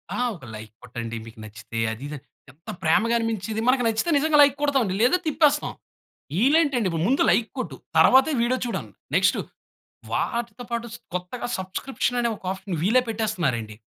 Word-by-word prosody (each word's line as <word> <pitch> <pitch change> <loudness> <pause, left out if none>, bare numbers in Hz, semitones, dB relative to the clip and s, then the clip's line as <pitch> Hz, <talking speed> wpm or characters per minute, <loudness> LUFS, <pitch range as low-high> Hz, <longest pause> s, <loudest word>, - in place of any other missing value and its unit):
ఆ! - - -3 0.2
ఒక 130 - -13
లైక్ 110 0 -9
కొట్టండి 115 -1 -6
మీకు 115 -1 -13
నచ్చితే 115 +1 -7
అది 115 +5 -7
ఇది 150 - -6
అని 135 - -16 0.3
ఎంత 155 +6 -15
ప్రేమగా 220 +8 +3
అనిపించిది. 220 -1 -2
మనకు 255 -1 +3
నచ్చితే 225 +9 0
నిజంగా 300 +1 +3
లైక్ 285 -1 +6
కొడతాం 285 -3 +2
అండి, 190 0 -2
లేదా 255 +9 +4
తిప్పేస్తాం. 300 -1 +2 0.7
ఈళ్ళేంటండి 275 - +3 0.2
ముందు 270 +4 +3
లైక్ 225 -1 +2
కొట్టు, 155 - -4 0.2
తరువాతే 265 - +6
వీడియో 255 +2 +1
చూడండి! 235 - -5 0.2
నెక్స్ట్ - - +3 0.7
వాటితో 235 0 -2
పాటు 235 0 -2 0.3
కొత్తగా 180 +8 -4
సబ్‌స్క్రిప్షన్ 245 +6 -2
అనే 235 - +1
ఒక 190 - -22
ఆప్షన్ 190 -2 -5
వీళ్ళే 240 +7 +4
పెట్టేస్తున్నారండి. 175 - -1
225 Hz, 160 wpm, -24 LUFS, 160-255 Hz, 0.7 s, లైక్